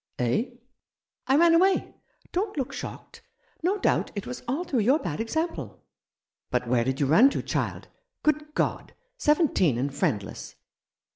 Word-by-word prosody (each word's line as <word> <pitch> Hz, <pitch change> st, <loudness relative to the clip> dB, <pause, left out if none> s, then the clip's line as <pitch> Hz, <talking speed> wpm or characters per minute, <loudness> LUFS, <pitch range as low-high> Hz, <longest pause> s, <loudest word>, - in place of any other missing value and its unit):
" -, -, -54 dB
Eh? 125 Hz, -, +1 dB, 0.4 s
" -, -, -63 dB
"I 265 Hz, -, +4 dB
ran 335 Hz, +2 st, +6 dB
away. 375 Hz, +3 st, +3 dB, 0.4 s
Don't 395 Hz, 0 st, -2 dB
look 270 Hz, 0 st, -2 dB
shocked. 250 Hz, -, -8 dB, 0.4 s
No 370 Hz, +5 st, +1 dB
doubt 390 Hz, -, +1 dB
it 200 Hz, -, -4 dB
was 250 Hz, -, -6 dB
all 275 Hz, +8 st, -1 dB
through 290 Hz, -8 st, -1 dB
your 250 Hz, +7 st, +4 dB
bad 170 Hz, -, -4 dB
example." 320 Hz, +9 st, -3 dB, 0.3 s
" -, -, -66 dB
But 125 Hz, -1 st, 0 dB
where 120 Hz, -1 st, +2 dB
did 130 Hz, +2 st, -2 dB
you 145 Hz, -, +2 dB
run 205 Hz, -, +6 dB
to, -, -, -3 dB
child? -, -, -3 dB, 0.4 s
Good 300 Hz, 0 st, 0 dB
God! -, -, -1 dB, 0.2 s
Seventeen 295 Hz, -, +3 dB
and 135 Hz, +3 st, -2 dB
friendless 115 Hz, -, -2 dB
255 Hz, 165 wpm, -26 LUFS, -, 0.4 s, ran